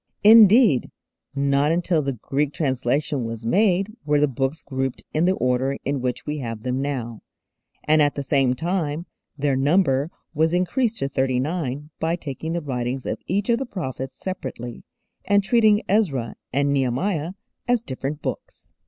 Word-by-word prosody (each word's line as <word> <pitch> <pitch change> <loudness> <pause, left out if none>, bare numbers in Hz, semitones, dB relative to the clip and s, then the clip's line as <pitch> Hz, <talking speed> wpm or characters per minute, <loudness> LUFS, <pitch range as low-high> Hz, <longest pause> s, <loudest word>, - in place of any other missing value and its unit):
Indeed, 215 - +7 0.5
not 140 +2 +2
until 170 -1 +1
the 140 -1 -2
Greek 140 +5 -2
translation 135 0 0
was 115 0 -5
made 195 - +2
were 150 -1 +2
the 150 - +4
books 135 +3 -2
grouped 130 -1 -3
in 155 +3 +2
the 185 +1 +3
order 130 +1 0
in 140 -1 -1
which 125 -1 -3
we 150 0 -3
have 115 -4 -5
them 130 +1 -1
now, 125 -5 -4 0.6
and 155 0 +4
at 145 -1 +2
the 140 - -3
same 135 -3 +2
time 165 0 -2 0.3
their 140 -1 +1
number 140 0 +2 0.2
was 160 +3 +2
increased 225 +6 0
to 135 - -1
thirty 130 -2 0
nine 150 -1 -3
by 165 +1 0
taking 160 0 -5
the 170 - -1
writings 125 -1 -3
of - - -3
each 200 +3 0
of 235 0 +3
the 270 - -4
prophets 130 - -5
separately, 125 -10 -6 0.4
and 200 +1 +3
treating 215 0 +4
Ezra 145 - +1 0.2
and 140 +1 +1
Nehemiah 145 +6 0 0.3
as 245 -1 +3
different 140 - -5
books. - - -6
145 Hz, 160 wpm, -23 LUFS, 130-180 Hz, 0.6 s, Indeed